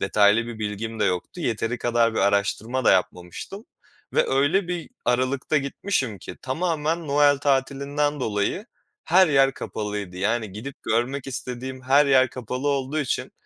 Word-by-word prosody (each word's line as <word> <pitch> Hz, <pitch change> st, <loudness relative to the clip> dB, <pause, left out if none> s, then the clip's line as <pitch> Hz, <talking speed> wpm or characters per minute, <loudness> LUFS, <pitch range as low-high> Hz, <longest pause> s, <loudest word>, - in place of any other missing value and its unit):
detaylı 105 Hz, +2 st, +3 dB
bir 120 Hz, -2 st, -7 dB
bilgim 110 Hz, +1 st, -4 dB
de -, -, +3 dB
yoktu. 90 Hz, -, -2 dB
Yeteri 115 Hz, -3 st, -1 dB
kadar 115 Hz, -1 st, +2 dB
bir -, -, -1 dB
araştırma 100 Hz, +5 st, 0 dB
da -, -, +6 dB
yapmamıştım 90 Hz, -, -2 dB, 0.5 s
ve -, -, +2 dB
öyle 145 Hz, +8 st, +2 dB
bir 175 Hz, +2 st, -4 dB
aralıkta 130 Hz, +4 st, +1 dB
gitmişim 135 Hz, -, -1 dB
ki -, -, -9 dB
tamamen 160 Hz, +2 st, -1 dB
Noel 145 Hz, 0 st, +4 dB
tatilinden 140 Hz, +1 st, 0 dB
dolayı 110 Hz, -, -1 dB, 0.4 s
her 185 Hz, +2 st, +5 dB
yer 135 Hz, -2 st, +4 dB
kapalıydı. 105 Hz, -4 st, -5 dB
Yani, 110 Hz, +2 st, -1 dB
gidip 120 Hz, +7 st, -8 dB
görmek 125 Hz, +5 st, -1 dB
istediğim 130 Hz, 0 st, -6 dB
her 140 Hz, +3 st, +4 dB
yer 130 Hz, -2 st, +4 dB
kapalı 125 Hz, +3 st, -4 dB
olduğu 140 Hz, +2 st, -1 dB
için, 140 Hz, -, -2 dB
130 Hz, 145 wpm, -24 LUFS, 110-145 Hz, 0.5 s, da